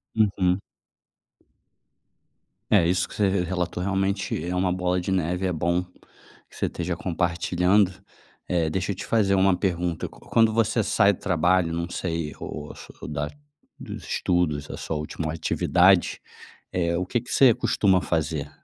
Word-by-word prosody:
Uhum. 95 -4 +2 2.1
É 85 -5 +5
isso 90 +1 +1
que - - -10
você 105 -2 +2 0.2
relatou, 90 0 -2
realmente 95 -3 -1
é 90 +1 -2
uma 90 0 +1
bola 90 0 0
de 95 - -3
neve, 90 0 0
é - - 0
bom 85 +2 0 0.6
que - - -19
você - - -1
esteja 85 0 -3
compartilhando. 90 +3 +1 0.6
Eh, 85 -3 +1
deixa 95 +4 -1
eu - - -3
te - - -7
fazer 100 -4 +2
uma 95 -1 +3
pergunta. 90 -4 -1
Quando 115 -1 +1
você 115 0 +2
sai 100 0 +4
do - - -10
trabalho, 90 -1 +2
não 85 +1 -3
sei, 85 -4 -3
ou 75 -1 -6 0.4
da 75 0 -2 0.5
dos - - -7
estudos, 85 -5 0
essa - - -7
sua 80 - -3
última 80 +1 -4
atividade, 90 +3 +3 0.5
eh, 85 -1 0
o 90 - -1
que 120 +5 -1
que 125 - -12
você 130 -4 +6
costuma 95 -3 +2
fazer? 80 -4 -2
90 Hz, 150 wpm, -25 LUFS, 85-95 Hz, 2.1 s, você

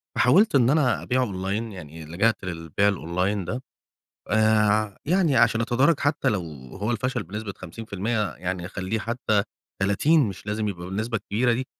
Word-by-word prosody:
فحاوِلت 185 - +4
إن 125 -3 +5
أنا 145 -3 +2
أبيع 130 +1 +1
أونلاين 100 0 -2
يعني، 80 -4 -9
لجأت 100 +8 +1
للبيع 85 +2 0
الأونلاين 95 +1 -1
ده 125 +9 -4 0.7
آآ، 110 -1 +3
يعني 170 -3 +2
عشان 115 -1 +4
أتدارك 130 +7 +2
حتى 145 -2 +1
لو 105 -6 +1 0.3
هو 105 +4 -2
الفشل 120 +3 -1
بنسبة 105 0 -6
50% 105 +3 -3
يعني 90 -1 -4
أخلِّيه 95 +3 -3
حتى 110 -2 0 0.4
30 140 +12 +3
مش 100 +1 -9
لازم 105 +1 -1
يبقى 90 -3 -5
بالنسبة 110 +5 -2
الكبيرة 115 +4 0
دي. 130 +3 -2
110 Hz, 155 wpm, -25 LUFS, 95-120 Hz, 0.7 s, إن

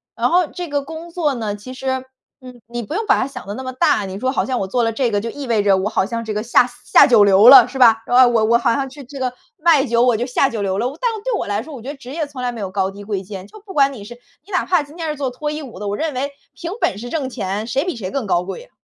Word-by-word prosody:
然 - - +1
后 355 -1 +3
这 355 +2 -6
个 285 0 0
工 320 +3 -9
作 315 -5 0
呢， 215 -3 -3
其 255 +5 -10
实， 265 0 -4 0.5
嗯， 250 -1 -12
你 240 0 -5
不 295 - -7
用 435 +4 -2
把 410 - +4
它 - - -1
想 275 - -9
得 205 - -4
那 260 - -6
么 255 - -4
大， 215 -5 +2
你 190 0 -6
说 260 +2 0
好 - - 0
像 255 -2 -2
我 190 - -2
做 240 +4 0
了 225 - +1
这 240 0 0
个 205 0 0
就 230 - -4
意 285 +1 -7
味 225 -3 +2
着 195 -2 +4
我 195 +3 -1
好 190 - +1
像 230 +2 -4
这 215 - -3
个 210 - -2
下 245 +1 +4 0.2
下 - - +7
九 225 -4 +6
流 200 +2 +6
了， 255 -3 +10
是 265 - -8
吧？ 230 -3 +7
哎， 255 +1 +6
我 235 -3 +2
我 235 +1 +4
好 235 -1 +1
像 270 0 -2
去 280 +1 -11
这 275 +2 -10
个 255 -1 -1 0.3
卖 305 -4 +4
酒 235 -1 +1
我 245 -3 +3
就 240 - -2
下 265 +2 +1
九 220 -3 -4
流 195 -1 -1
了。 240 +4 0
但 480 -2 +1
是 - - -4
对 - - -2
我 - - -3
来 205 +1 -1
说， 310 0 -11
我 245 - -8
觉 255 - -11
得 290 - -5
职 255 -2 -13
业 315 +1 -2
从 270 -3 -8
来 245 -1 -1
没 235 - -8
有 195 -2 -4
高 190 -1 0
低 200 +1 -11
贵 200 -2 -3
贱。 190 -1 -8
就 430 - -14
不 385 - -9
管 275 -1 +3
你 210 - -9
是， 240 +4 -10 0.3
你 410 - -16
哪 360 - 0
怕 360 -4 +2
今 295 +3 -15
天 330 -2 -4
是 300 - -2
做 270 -2 -2
脱 295 +4 -4
衣 305 +1 -5
舞 235 -9 -10
的， 205 - -4
我 200 - -1
认 315 +1 -2
为 275 +3 -3 0.2
凭 340 0 -6
本 195 - +1
事 240 +3 -7
挣 275 -4 -2
钱， 205 -2 -3
谁 275 +8 -1
比 360 - -3
谁 190 -5 -5
更 275 -5 -2
高 175 -1 +1
贵 195 - -7
啊。 - - -21
250 Hz, 355 characters per minute, -19 LUFS, 215-285 Hz, 0.5 s, 了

